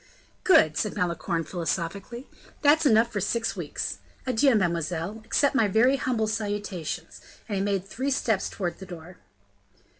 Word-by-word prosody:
"Good!" 155 - +5
said 210 - -1
Malicorne, 170 -1 -1
philosophically, 185 - -4 0.4
"that's 300 +1 +5
enough 230 -1 +4
for 205 - -1
six 225 +4 -1
weeks. - - -4 0.3
Adieu, 255 +1 +3
mademoiselle, 175 +2 -1
accept 280 +5 +2
my 230 -6 +3
very 240 +7 +4
humble 245 -5 0
salutation." 205 -6 -3 0.4
And 205 -3 -1
he - - 0
made 195 -2 0
three 260 +7 -2
steps 225 -7 0
towards 175 -4 -4
the 190 - -9
door. 175 0 -10
205 Hz, 145 wpm, -26 LUFS, 175-235 Hz, 0.4 s, Good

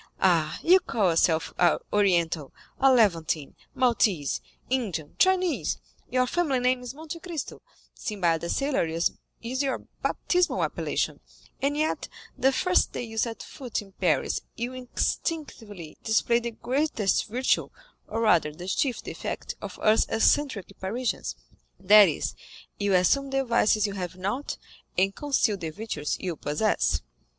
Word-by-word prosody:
Ah, 165 -5 +2
you 365 +3 +7
call 210 - +1
yourself 165 0 +2 0.4
Oriental, 170 -7 +2 0.3
a 270 0 +6
Levantine, 170 - +2 0.2
Maltese, 215 - +2 0.3
Indian, 200 - -2
Chinese; 370 -3 +2 0.3
your 255 0 +2
family 280 -2 +1
name 250 0 +2
is 250 +1 -7
Monte 320 +2 -7
Cristo; 335 -4 -6 0.3
Sinbad 175 -8 -1
the 170 - -4
Sailor 275 - +1
is 165 +1 0 0.3
your 260 +3 -2 0.2
baptismal 360 0 +1
appellation, - - -1 0.4
and 285 +2 +1
yet 310 +1 -1 0.3
the 270 - +3
first 365 +7 +2
day - - -3
you 225 -1 -8
set 225 0 -2
foot 250 -5 -5
in 195 - -17
Paris 170 -7 0
you 240 +2 -4
instinctively 245 - -4
display 235 +2 +2
the 235 0 -3
greatest 245 -3 0
virtue, 250 +4 +1 0.4
or 225 +1 -2
rather 175 -9 +4
the 175 +4 -9
chief 250 +6 0
defect, - - -5
of - - -7
us 215 +1 +3
eccentric 225 -3 +2
Parisians,—that 190 - +2
is, - - -2 0.5
you 200 -2 +2
assume 270 +10 +3
the 270 0 0
vices 215 -3 +3
you 200 - -2
have 180 -2 -5
not, 200 +10 -3 0.4
and 195 +2 +2
conceal 275 -8 +1
the 165 -4 -4
virtues 155 -5 -3
you 180 -3 -3
possess." 150 - 0
220 Hz, 135 wpm, -27 LUFS, 175-260 Hz, 0.5 s, you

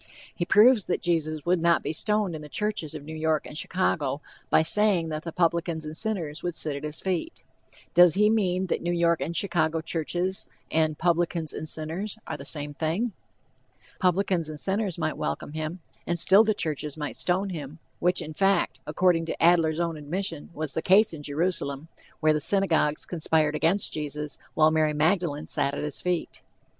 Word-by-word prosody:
He 175 - -2
proves 215 +3 +5
that - - -1
Jesus 155 -3 -1
would 175 -1 +2
not 170 0 +3
be - - -2
stoned 210 +1 0
in 155 - -6
the 150 - -10
churches 210 -5 -2
of 150 - -7
New 155 +2 -8
York 155 -1 0
and - - -9
Chicago 150 -5 -1 0.3
by 155 - +4
saying 185 -1 +3
that 155 -1 -3
the 165 - -6
"publicans 170 -1 0
and 155 +1 -6
sinners 170 -7 -2
would 175 -1 -3
sit 150 -2 0
at 140 - -7
his 150 +1 -3
feet." 190 - -3 0.5
Does 175 -2 +7
he 210 +1 +4
mean 190 -4 +1
that 180 - -2
"New 175 - -1
York 170 -1 +2
and 170 - -3
Chicago 165 -4 +1
churches" 175 +3 -2 0.2
and 155 -1 +1
"publicans 170 -2 0
and 155 - -4
sinners" 170 +8 -3
are - - -4
the 140 - -9
same 145 0 -4
thing? 165 +10 -1 0.9
"Publicans 185 -3 +1
and 155 -1 -5
sinners" 195 -1 0
might 155 -2 -2
welcome 145 - -3
him, 155 +3 -4 0.3
and 175 - 0
still 190 +5 +6
the 215 -1 +1
churches 150 -4 -3
might 150 -1 -4
stone 190 +2 0
him, 150 -3 -7 0.2
which 180 +1 +1
in 155 - -7
fact, 190 -7 +1
according 165 +1 +2
to - - -4
Adler's 165 -2 +4
own 170 -2 -1
admission, 165 +1 -4
was 155 -2 -3
the 160 - -1
case 195 +2 +4
in 155 - -7
Jerusalem, 150 -1 -2 0.3
where 155 -1 +4
the 150 - -1
synagogues 165 -5 +2
conspired 160 -3 +1
against 170 +6 +1
Jesus, 150 -1 -4 0.2
while 155 0 +5
Mary 155 -1 +2
Magdalene 155 -1 +1
sat 140 +1 0
at - - -4
his 150 -2 -3
feet. 180 -2 -2
165 Hz, 190 wpm, -26 LUFS, 155-185 Hz, 0.9 s, Does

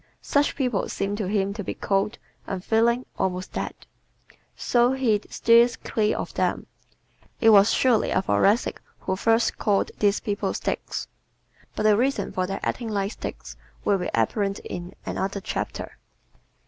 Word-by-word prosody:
Such 285 0 +1
people 250 -8 -1
seem 200 +1 -2
to 205 -4 -2
him 200 0 0
to 205 0 -5
be - - -4
cold, 205 +3 0 0.3
unfeeling, 225 +6 +1
almost 185 0 -2
dead. - - -3 0.8
So 240 +1 +2
he 235 -6 +1
steers 235 +1 +4
clear 215 -1 -1
of - - -5
them. - - 0 0.7
It 225 -1 +6
was 205 0 +7
surely 250 -4 +3
a - - +2
Thoracic 195 - +2 0.2
who 190 - -1
first 225 +3 +2
called 200 -2 +1
these 205 -1 +3
people 205 -3 -2
"sticks." - - -3 0.7
But - - -2
the 215 -1 +5
reason 265 +6 0
for 185 0 -1
their 195 +1 -3
acting 235 -2 -2
like 200 -1 -1
sticks - - -7 0.3
will 200 -1 +3
be 180 - -2
apparent 195 - 0
in 175 0 -6
another 195 +1 -2
chapter. 190 - -5
205 Hz, 150 wpm, -25 LUFS, 195-230 Hz, 0.8 s, was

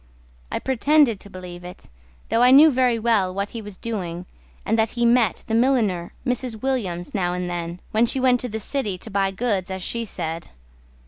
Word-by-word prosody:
I - - -1
pretended 265 -3 +3
to 200 - -12
believe 180 -2 -9
it, 180 +1 -11 0.4
though 230 - +2
I 250 - +7
knew 295 +4 +8
very 250 -2 +2
well 220 -5 +2
What 200 +2 -3
he 230 - -6
was 205 -3 -9
doing, 180 -6 -4 0.4
and 225 - +1
that 220 0 +2
he 240 - +2
met 235 -3 +3
The 225 - -4
milliner, 225 -8 +2
Mrs. 250 -3 -2
Williams, 195 -10 -2
now 180 -4 0
and 180 0 -3
then 175 0 -4
When 225 +2 +3
she 265 - -1
went 255 -1 +3
to 250 - -3
the 220 0 -4
city 215 -5 -2
to 220 +4 -10
buy 195 -1 +1
goods, 195 -2 -1
as 190 -1 -5
she 235 +4 -2
said. 165 -5 -4
215 Hz, 200 wpm, -23 LUFS, 185-245 Hz, 0.4 s, knew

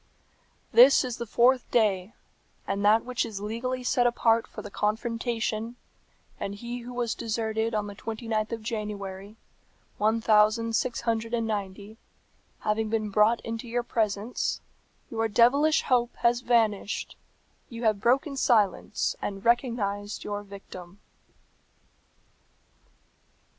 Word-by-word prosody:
"This 260 +3 +7
is 250 -2 -4
the 235 - -5
fourth 250 +3 +3
day, 210 -3 +1 0.5
and 200 +1 -2
that 215 +3 +4
which 250 -1 -1
is 220 -4 -6
legally 240 +5 -3
set 245 0 +2
apart 230 -1 +2
for - - -9
the 205 - -9
confrontation, 230 +1 -2 0.6
and 200 0 -4
he 240 +3 -6
who 245 +1 -9
was 240 -2 -1
deserted 220 0 -2
on 210 -1 0
the 205 - -7
twenty 225 +3 -7
ninth 215 0 -1
of 225 -1 -5
January, 205 -3 -5 0.6
one 220 +2 +2
thousand 225 +1 +3
six 245 +1 -1
hundred 230 0 -1
and 230 -1 -1
ninety, 205 0 -5 0.6
having 215 +1 0
been 215 -2 -1
brought 215 +3 +3
into 230 +1 -5
your 240 +1 -1
presence, 215 0 -1 0.5
your 225 -1 0
devilish 265 +8 +4
hope 245 -2 +1
has 240 +1 +2
vanished, 225 -4 0 0.5
you 235 0 -7
have 215 -3 +2
broken 270 +5 +2
silence, 215 -6 +1
and 195 +1 -5
recognized 220 -4 0
your 205 0 -4
victim." 195 -2 -11
225 Hz, 130 wpm, -27 LUFS, 210-235 Hz, 0.6 s, This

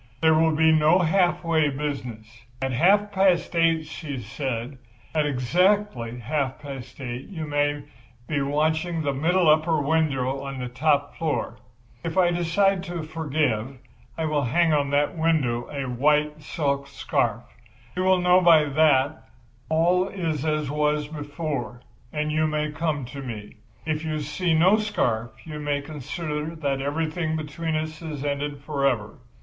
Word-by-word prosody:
There 160 0 +4
will 160 0 +3
be 160 +1 +5
no 155 +2 +5
half 180 0 +2
way 160 -3 +2
business. 135 -6 -4 0.3
At 135 0 -1
half 200 +10 +3
past 190 -3 +2
eight,' 165 -1 +3
she 155 -2 -6
said, 125 +2 -4 0.3
'at 155 -2 +2
exactly 145 - +1
half 135 +2 -2
past 135 -4 -9
eight 125 -1 -5
you 165 -6 -5
may 145 0 0 0.4
be 145 -2 0
watching 155 +4 0
the 140 -1 0
middle 170 +5 +2
upper 155 +1 +4
window 140 -3 0
of 135 -1 -5
the 125 -1 -4
top 145 +3 +1
floor. 160 -3 -2 0.4
If 165 +2 -4
I 175 -2 +4
decide 180 +3 +2
to 175 -3 -4
forgive 150 -6 -1 0.4
I 160 - -1
will 150 -2 +1
hang 165 +7 +2
out 145 -1 +2
of - - -5
that 145 +4 +1
window 150 -8 0
a 140 -2 -4
white 150 +4 +1
silk 140 -2 -2
scarf. 140 - -1 0.5
You 185 - 0
will 185 -1 +4
know 180 +1 +5
by 165 -3 +6
that 145 -2 -4
that 150 -1 +3 0.4
all 175 +4 +3
is 165 -7 -3
as 155 -2 -1
was 150 0 0
before, 145 -4 -4 0.3
and 150 0 -2
you 155 0 +2
may 150 0 -1
come 150 -3 -2
to 140 +3 -8
me. 110 -5 -8 0.3
If 155 0 -2
you 155 -1 -2
see 160 +3 0
no 185 +6 +5
scarf 120 - -1 0.2
you 155 -2 -6
may 145 -1 -1
consider 150 +2 -5
that 140 -4 -1
everything 160 +3 -1
between 155 +1 -3
us 155 0 -3
is 150 -4 -5
ended 145 0 -3
forever. 140 -8 -1
150 Hz, 160 wpm, -25 LUFS, 140-165 Hz, 0.5 s, by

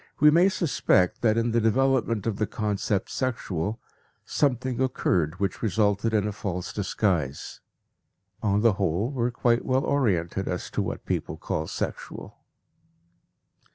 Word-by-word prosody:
We 150 +1 +7
may 175 +5 +5
suspect 140 - +1
that 110 -2 +3
in 115 0 +1
the 115 +1 +2
development 115 -2 +2
of 110 -3 -1
the 105 - 0
concept 105 -2 -1
"sexual" 110 -5 -2 0.5
something 130 -3 0
occurred 90 - 0
which 100 -2 -2
resulted 105 0 +1
in 105 -2 +1
a - - -1
false 90 -3 -4
disguise. 90 -8 -1 0.8
On 105 -1 +2
the 115 -2 +5
whole, 95 - 0
we 125 -4 -1
are - - +2
quite 120 0 +1
well 130 +1 +1
oriented 95 -9 0
as 90 - -3
to - - -1
what - - -4
people - - -2
call 80 0 -3
sexual. - - -6
110 Hz, 145 wpm, -26 LUFS, 95-125 Hz, 0.8 s, We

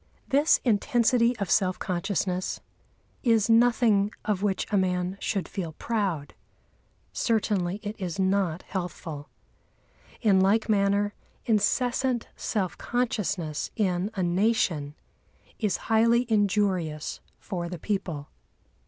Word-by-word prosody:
This 285 +3 +4
intensity 235 +1 +2
of 200 -4 -3
self 185 -3 +2
consciousness 185 0 -2 0.6
is 230 -3 +3
nothing 225 -3 +4
of 205 -3 0
which 200 -2 0
a - - +2
man 180 -1 0
should 195 -4 -2
feel 170 -5 -5
proud; 190 -9 -2 0.8
certainly 205 -4 0
it 210 +1 -5
is 180 -3 -4
not 190 -3 +1
healthful. 160 -5 -6 0.9
In 205 -5 +4
like 200 +4 +3
manner, 205 -1 +2 0.3
incessant 245 +2 +1
self 195 -5 -2
consciousness 200 -10 -1
in 190 -2 0
a 190 - -1
nation 175 -6 +1 0.6
is 210 -5 0
highly 230 +2 +3
injurious 190 -7 0 0.2
for 175 -2 -5
the 180 - -5
people. 165 -6 -3
200 Hz, 110 wpm, -27 LUFS, 180-225 Hz, 0.9 s, This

